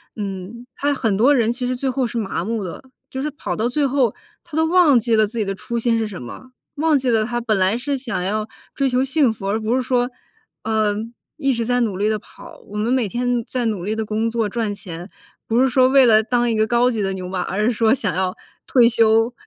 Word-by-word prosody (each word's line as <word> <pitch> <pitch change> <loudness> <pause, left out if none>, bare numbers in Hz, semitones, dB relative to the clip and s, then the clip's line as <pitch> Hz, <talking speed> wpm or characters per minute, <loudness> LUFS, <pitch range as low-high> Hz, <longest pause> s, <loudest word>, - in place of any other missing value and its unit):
嗯， 200 +3 -6
他 290 +1 0
很 225 -7 0
多 265 +7 +5
人 230 -3 +2
其 250 0 -3
实 255 - -1
最 265 +2 -2
后 260 -1 0
是 235 - -5
麻 195 -6 -2
木 225 -1 -2
的， 180 - -7 0.3
就 265 - -4
是 300 - -1
跑 290 - -4
到 225 - 0
最 290 +3 0
后 260 -4 +1 0.3
他 340 -3 -10
都 320 - +3
忘 330 -5 +5
记 235 0 +1
了 215 -1 +3
自 230 +3 -9
己 220 - +1
的 195 - -2
初 235 +5 -5
心 230 0 +1
是 220 - -1
什 200 -4 -8
么， 255 - -10 0.2
忘 310 0 +2
记 260 -2 -1
了 220 -2 +2
他 240 +1 -2
本 220 -4 0
来 190 +4 +2
是 275 +3 -2
想 240 -8 -3
要 210 +3 -1 0.3
追 275 - 0
求 250 +1 +1
幸 270 -2 +2
福， 200 -3 -6
而 215 +2 0
不 220 +2 0
是 260 - +1
说， 245 -1 0 0.5
嗯， 220 +1 -1 0.2
一 275 -4 0
直 235 -1 -1
在 245 +1 +1
努 210 -6 -1
力 205 +2 +1
地 215 - 0
跑， - - -14
我 205 - -9
们 220 +3 0
每 255 -4 +1
天 245 +1 -1
在 250 -2 -2
努 210 -6 -2
力 210 +4 -2
地 220 - -2
工 220 +2 -1
作 225 -2 -1
赚 220 -1 -2
钱， 175 -2 -8 0.4
不 230 +2 +2
是 265 - +4
说 255 0 +4
为 270 -1 +6
了 220 -1 +5
当 240 +1 +1
一 230 - 0
个 215 0 +2
高 240 +2 +3
级 225 -4 -2
的 195 0 -1
牛 185 -1 -5
马， 185 -1 -2
而 210 +3 -1
是 240 - +3
说 225 0 +3
想 220 -8 -1
要 185 0 -1 0.3
退 245 -3 +5
休， 225 0 +3
230 Hz, 275 characters per minute, -20 LUFS, 215-255 Hz, 0.5 s, 为